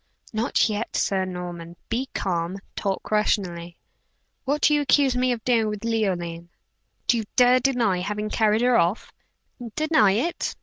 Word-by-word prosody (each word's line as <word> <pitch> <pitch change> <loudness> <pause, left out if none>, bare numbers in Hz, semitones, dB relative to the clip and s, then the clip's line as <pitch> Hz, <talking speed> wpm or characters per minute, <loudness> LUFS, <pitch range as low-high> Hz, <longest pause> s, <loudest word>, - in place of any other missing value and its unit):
"Not 220 +1 +1
yet, 215 +1 -3
Sir 190 -1 +1
Norman. 175 -2 -7
Be 255 +3 -2
calm; 175 0 -2 0.2
talk 195 0 -3
rationally. 175 -5 -1 0.7
What 285 +2 0
do 300 - +4
you 295 - +3
accuse 280 -2 +3
me 250 0 +1
of 235 -3 -3
doing 230 -3 +2
with 210 +1 -5
Leoline?" 175 -7 -2 0.6
"Do 240 - +3
you 220 - -3
dare 250 0 +5
deny 240 -8 +1
having 210 +3 -3
carried 220 0 +2
her 250 -1 +4
off?" 170 +6 -1 0.6
"Deny 310 -11 +3
it? 275 - -2
215 Hz, 150 wpm, -24 LUFS, 185-250 Hz, 0.7 s, dare